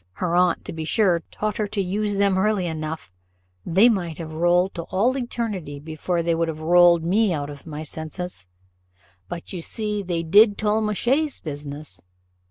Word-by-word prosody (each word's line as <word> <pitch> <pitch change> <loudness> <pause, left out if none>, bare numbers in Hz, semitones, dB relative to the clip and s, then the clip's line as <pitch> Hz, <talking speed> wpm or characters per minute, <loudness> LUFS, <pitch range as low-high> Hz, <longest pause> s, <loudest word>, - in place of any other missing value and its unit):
her 175 - -1
aunt, 180 -1 +2
to - - -5
be 160 -1 -4
sure, 175 0 +2
taught 215 -1 -3
her 210 -2 -1
the 200 -2 0
use 205 +3 -1
of - - -3
them 200 -1 +3
early 195 -1 +1
enough: 155 - -5 0.5
they 190 - +5
might 180 -8 0
have 160 -2 -7
rolled 175 +3 +2
to 170 - -4
all 225 +8 +1
eternity 220 - -4
before 160 +3 -2
they 170 0 +1
would 165 0 0
have 160 -1 -4
rolled 170 +1 +5
me 200 +4 +2
out 145 -3 -3
of 145 +3 -12
my 155 0 -6
senses; 160 - -6 0.8
but 170 - -7
you 180 - -4
see 210 +3 -2
they 175 -3 -2
did 205 +5 +5
Tollemache's 220 +7 0
business. 145 - -7
175 Hz, 180 wpm, -23 LUFS, 160-210 Hz, 0.8 s, they